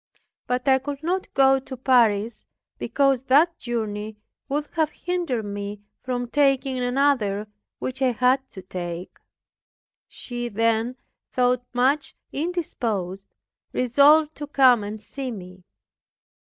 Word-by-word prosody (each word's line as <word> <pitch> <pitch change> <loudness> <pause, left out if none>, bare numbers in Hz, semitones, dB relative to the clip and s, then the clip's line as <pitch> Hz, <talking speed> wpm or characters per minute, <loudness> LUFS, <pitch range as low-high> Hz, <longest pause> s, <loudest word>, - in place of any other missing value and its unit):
But 250 +2 -1
I 265 -1 +5
could 285 +2 -6
not 365 +3 -1
go 270 0 +5
to 260 0 -9
Paris, 235 -4 +2 0.4
because 275 -3 +2
that 310 +6 +4
journey 215 -3 -4 0.3
would 295 +2 -1
have 315 -3 +1
hindered 335 -10 -2
me 205 0 -5 0.2
from 245 -1 -3
taking 270 -1 +2
another, 245 -5 +1 0.3
which 260 +1 -5
I 255 -2 +3
had 255 +3 +2
to 190 - -9
take. 180 -1 -6 0.9
She 240 -1 -6
then, 230 +2 +1 0.4
though 250 -1 +3
much 265 +4 +1 0.2
indisposed, 225 - -3 0.4
resolved 290 +5 +5
to 295 - -5
come 255 -6 +5
and 210 +1 -5
see 265 +5 -6
me. 185 -4 -9
250 Hz, 120 wpm, -24 LUFS, 215-275 Hz, 0.9 s, I